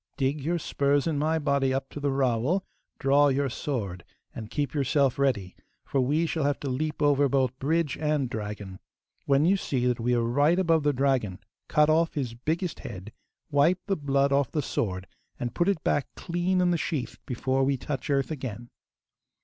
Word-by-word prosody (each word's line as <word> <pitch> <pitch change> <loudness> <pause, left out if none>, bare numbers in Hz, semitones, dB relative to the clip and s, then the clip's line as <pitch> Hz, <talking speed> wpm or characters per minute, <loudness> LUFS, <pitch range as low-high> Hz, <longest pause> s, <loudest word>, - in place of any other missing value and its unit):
Dig 140 +1 0
your 170 +5 0
spurs 145 -3 +1
in 160 -4 0
my 160 +2 +1
body 140 -3 +1
up 135 +1 -1
to - - -7
the 145 0 0
rowel, 135 - +1 0.3
draw 140 +1 +4
your 140 0 +1
sword, 100 -12 -4 0.3
and 110 -1 -7
keep 145 0 -2
yourself 140 -1 +1
ready, 110 -10 0 0.3
for 135 - 0
we 150 +6 +1
shall 160 -1 -1
have 145 0 0
to 140 - -2
leap 150 +3 -2
over 145 -1 +4
both 130 -1 0
bridge 160 +2 0
and 150 -3 +1
dragon. 105 -4 -6 0.5
When 140 +2 +4
you 195 +3 +4
see 130 -8 -1
that 125 -1 +1
we 120 +2 +1
are 120 - +1
right 145 +8 +3
above 165 -4 +3
the 145 0 +2
dragon 130 -8 0 0.3
cut 150 0 +4
off 165 +2 +2
his 130 -6 -2
biggest 160 +8 -2
head, 105 0 -8 0.4
wipe 155 +6 +3
the 195 - 0
blood 140 -3 +1
off 140 -1 +2
the 150 -3 -1
sword, 95 -6 -2 0.3
and 120 -1 -3
put 175 +2 +1
it 195 -6 -1
back 145 - +1
clean 175 +1 0
in 180 -1 +3
the 170 - +1
sheath 130 -7 -3
before 130 +2 0
we 135 0 +1
touch 135 +1 -5
earth 140 +1 +1
again. 120 -5 -6
140 Hz, 190 wpm, -27 LUFS, 125-155 Hz, 0.5 s, draw